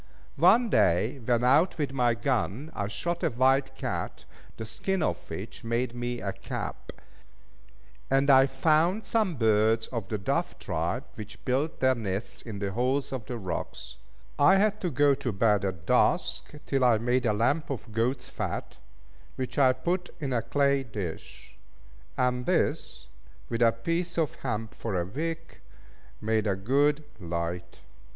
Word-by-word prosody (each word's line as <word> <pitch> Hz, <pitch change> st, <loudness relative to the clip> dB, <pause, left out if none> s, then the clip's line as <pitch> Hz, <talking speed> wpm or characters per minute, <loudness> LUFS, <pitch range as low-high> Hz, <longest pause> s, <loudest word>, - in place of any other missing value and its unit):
One 215 Hz, +6 st, +5 dB
day, 110 Hz, +11 st, +3 dB
when 120 Hz, 0 st, +1 dB
out 145 Hz, +9 st, +4 dB
with 145 Hz, -4 st, -2 dB
my 120 Hz, -3 st, +2 dB
gun, 115 Hz, -, -1 dB
I 100 Hz, -7 st, -2 dB
shot 115 Hz, +13 st, -3 dB
a 165 Hz, -, +2 dB
wild 135 Hz, +2 st, +2 dB
cat, -, -, -4 dB, 0.3 s
the 110 Hz, -, -5 dB
skin 190 Hz, -, -1 dB
of -, -, -2 dB
which -, -, -7 dB
made 115 Hz, +1 st, -1 dB
me 120 Hz, 0 st, -3 dB
a 100 Hz, -1 st, -3 dB
cap; -, -, -6 dB, 1.2 s
and 135 Hz, +1 st, +4 dB
I 135 Hz, 0 st, +7 dB
found 160 Hz, +9 st, +2 dB
some 215 Hz, -7 st, +1 dB
birds 110 Hz, -1 st, +3 dB
of 115 Hz, -6 st, -4 dB
the 110 Hz, -, -2 dB
dove 95 Hz, -, -1 dB
tribe, -, -, -2 dB
which 105 Hz, -1 st, -10 dB
built 140 Hz, +5 st, -1 dB
their 130 Hz, 0 st, +5 dB
nests 105 Hz, -3 st, -4 dB
in 110 Hz, -4 st, -7 dB
the 100 Hz, -1 st, -2 dB
holes 130 Hz, +5 st, 0 dB
of 130 Hz, -5 st, -5 dB
rocks. 90 Hz, -, -5 dB, 0.4 s
I 165 Hz, +7 st, +7 dB
had 210 Hz, +1 st, +2 dB
to 180 Hz, -, 0 dB
go 145 Hz, 0 st, +4 dB
to 135 Hz, -3 st, -2 dB
bed 105 Hz, -1 st, +2 dB
at 95 Hz, -5 st, -3 dB
dusk, -, -, +2 dB
till 135 Hz, -2 st, +1 dB
I 120 Hz, -3 st, +5 dB
made 120 Hz, +2 st, +1 dB
a 105 Hz, -, +3 dB
lamp 120 Hz, +9 st, +1 dB
of 125 Hz, -4 st, -5 dB
goat's 125 Hz, +3 st, 0 dB
fat, -, -, -4 dB, 0.6 s
which 130 Hz, +1 st, -3 dB
I 130 Hz, -2 st, +6 dB
put 175 Hz, +8 st, -2 dB
in 140 Hz, -4 st, -2 dB
a 115 Hz, -, +1 dB
clay 140 Hz, +3 st, +2 dB
dish; 105 Hz, -9 st, -7 dB, 0.6 s
and 125 Hz, -1 st, 0 dB
this, 65 Hz, 0 st, 0 dB, 0.4 s
with 115 Hz, 0 st, -2 dB
a 115 Hz, -1 st, +6 dB
piece 165 Hz, +10 st, -2 dB
of 160 Hz, -4 st, +1 dB
hemp 110 Hz, -3 st, -3 dB
for 100 Hz, -6 st, -3 dB
a 85 Hz, -, -1 dB
wick, 165 Hz, -, -5 dB, 0.6 s
made 110 Hz, 0 st, 0 dB
a 100 Hz, -, +1 dB
good 140 Hz, +9 st, +2 dB, 0.2 s
light. 85 Hz, 0 st, -4 dB
125 Hz, 160 wpm, -28 LUFS, 110-145 Hz, 1.2 s, I